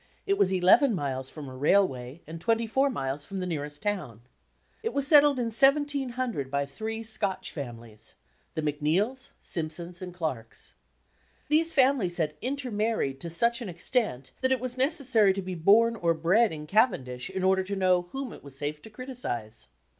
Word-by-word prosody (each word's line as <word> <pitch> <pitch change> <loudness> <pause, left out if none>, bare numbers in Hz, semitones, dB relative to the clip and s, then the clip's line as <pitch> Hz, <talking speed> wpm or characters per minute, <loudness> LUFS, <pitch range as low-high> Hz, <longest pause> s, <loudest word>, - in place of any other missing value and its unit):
It 395 - +2
was 190 - +2
eleven 190 +7 +5
miles 135 -4 -3
from 150 -3 -8
a 130 - -9
railway 140 -2 +1
and 165 +1 -8
twenty 230 +3 +1
four 265 +5 +2
miles 135 - -3
from 195 +5 -5
the 185 - -2
nearest 150 -4 -5
town. 165 - -3 0.6
It 455 - -3
was 280 -1 +1
settled 290 -2 +6
in 245 - 0
1 230 - -3
700 260 - +1
by 140 +1 0
three 220 +11 -5
Scotch 210 -4 -2
families 115 -6 -8 0.4
the 155 - -2
Macneills, 170 - 0
Simpsons, 170 +2 -4
and 180 -1 -6
Clarks. 155 -10 -5 0.8
These 320 +2 +3
families 255 - +3
had 155 -3 0
inter 265 0 -3
married 210 -11 -1
to 170 - -6
such 235 +9 +1
an 225 - -5
extent 170 - -2
that 260 0 +2
it 260 - +2
was 250 0 -4
necessary 255 - +3
to 195 - -3
be 185 0 -5
bom 220 +7 +4
or 170 -1 +2
bred 190 +8 +3
in 150 -1 -7
Cavendish 150 - +1
in 190 - -4
order 190 0 +3
to 200 +2 -4
know 180 -2 +2
whom 270 -3 -5
it - - -13
was 140 -1 -10
safe 150 +1 -4
to - - -12
criticize. 210 - -6
190 Hz, 180 wpm, -28 LUFS, 150-245 Hz, 0.8 s, settled